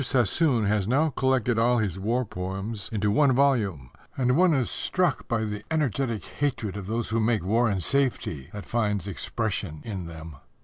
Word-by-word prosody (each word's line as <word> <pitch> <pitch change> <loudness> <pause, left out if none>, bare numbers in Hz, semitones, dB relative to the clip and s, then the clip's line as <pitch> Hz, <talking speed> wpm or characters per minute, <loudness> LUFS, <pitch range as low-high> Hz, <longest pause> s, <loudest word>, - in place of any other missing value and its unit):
Sassoon 125 - +2
has 100 -1 +1
now 145 +6 +2
collected 125 -3 +1
all 120 +2 +3
his 100 -5 -1
war 120 +6 0
poems 95 +3 -5
into 105 -2 0
one 140 +4 +4
volume, 110 - +1 0.3
and 125 -1 +2
one 180 +2 +5
is 135 -6 +1
struck 180 -5 0
by 115 -2 0
the 105 -1 -5
energetic 135 -7 -1
hatred 125 -9 -2
of 100 -2 -6
those 115 +2 -2
who 115 +1 +1
make 110 -4 +1
war 115 +4 +2
in 100 -2 0
safety 115 - 0
that 105 -1 -7
finds 105 -5 -1
expression 100 -4 -3
in 95 -6 -5
them. 80 -3 -9
115 Hz, 175 wpm, -26 LUFS, 100-130 Hz, 0.3 s, one